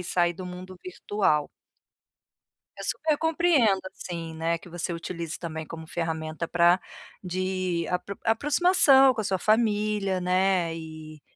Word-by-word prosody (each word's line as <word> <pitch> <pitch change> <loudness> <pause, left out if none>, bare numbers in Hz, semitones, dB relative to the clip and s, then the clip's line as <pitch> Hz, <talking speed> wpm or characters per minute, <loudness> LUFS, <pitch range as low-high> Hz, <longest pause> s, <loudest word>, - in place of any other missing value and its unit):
e - - -6
sair 175 0 +1
do 185 0 -7
mundo 185 +1 -9
virtual. 185 -4 0 1.3
Eu - - -7
super 310 -2 0
compreendo, 320 - +3
assim, 165 -2 -6
né, 165 +1 -1
que 165 - -15
você 175 +1 -4
utilize, 165 -1 -5
também, 160 -2 -6
como 160 0 -9
ferramenta 160 0 -3
para 175 +1 +5
apro 190 - -12 0.4
de 185 -1 -2 0.4
aproximação 275 +2 +5
com 220 - -2
a - - -5
sua 190 -1 0
família, 210 -3 +1
né, 180 -2 +1
e 155 -2 -9
180 Hz, 135 wpm, -26 LUFS, 165-210 Hz, 1.3 s, para